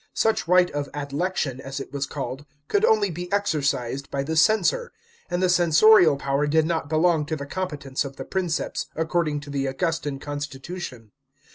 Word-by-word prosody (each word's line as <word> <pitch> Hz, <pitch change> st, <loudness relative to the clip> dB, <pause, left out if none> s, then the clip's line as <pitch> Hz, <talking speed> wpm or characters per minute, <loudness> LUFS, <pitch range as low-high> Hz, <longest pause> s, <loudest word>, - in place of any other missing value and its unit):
Such 220 Hz, -5 st, +1 dB
right 180 Hz, 0 st, +4 dB
of 145 Hz, -1 st, -3 dB
adlection, 145 Hz, -1 st, -2 dB
as 135 Hz, +1 st, -6 dB
it 135 Hz, -, -8 dB
was 140 Hz, 0 st, -2 dB
called, 135 Hz, 0 st, -6 dB, 0.2 s
could 410 Hz, -, +1 dB
only 210 Hz, -, +3 dB
be 175 Hz, +2 st, -6 dB
exercised 140 Hz, -9 st, -1 dB
by 135 Hz, 0 st, -2 dB
the 160 Hz, +3 st, -3 dB
censor; 215 Hz, -, +3 dB, 0.4 s
and 175 Hz, +1 st, -1 dB
the -, -, +4 dB
censorial 175 Hz, -1 st, +6 dB
power 140 Hz, +1 st, 0 dB
did 155 Hz, +1 st, +3 dB
not 160 Hz, -3 st, -2 dB
belong 160 Hz, 0 st, +3 dB
to 155 Hz, -, -1 dB
the 140 Hz, -2 st, -6 dB
competence 145 Hz, -5 st, -3 dB
of 135 Hz, -1 st, -8 dB
the -, -, -7 dB
Prince) 180 Hz, -4 st, -1 dB
s, -, -, -4 dB
according 160 Hz, -2 st, 0 dB
to 145 Hz, -1 st, -9 dB
the 140 Hz, -1 st, -1 dB
Augustan 145 Hz, 0 st, -2 dB
con 145 Hz, +1 st, -5 dB
stitution. 135 Hz, -, -7 dB
155 Hz, 180 wpm, -24 LUFS, 140-180 Hz, 0.4 s, censorial